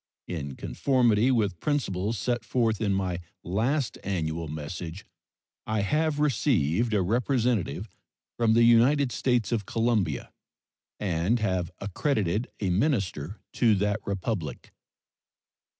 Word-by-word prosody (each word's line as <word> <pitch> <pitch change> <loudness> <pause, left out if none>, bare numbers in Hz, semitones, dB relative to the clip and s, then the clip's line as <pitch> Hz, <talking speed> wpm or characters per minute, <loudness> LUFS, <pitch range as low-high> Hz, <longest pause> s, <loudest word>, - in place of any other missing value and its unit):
In 70 -6 -4
conformity 125 -4 +2
with 105 -9 +1
principles 110 -8 -1
set 120 +3 -1
forth 115 -2 0
in 105 -2 +1
my 95 -3 -1 0.2
last 115 - 0
annual 85 -4 -2
message, 80 +4 -6 0.6
I 110 -1 0
have 150 +8 +1
received 115 - +2
a 100 - +3
representative 115 - 0 0.5
from 115 -2 +3
the 115 - +6
United 125 +4 +5
States 120 -5 +1
of 110 -5 -1
Colombia, 110 - 0 0.7
and 95 +4 +1
have 95 -5 0
accredited 105 - -1
a 95 -3 0
minister 100 - 0
to 115 -4 +4
that 105 +2 0
Republic. 100 -5 -4
105 Hz, 115 wpm, -27 LUFS, 90-120 Hz, 0.7 s, the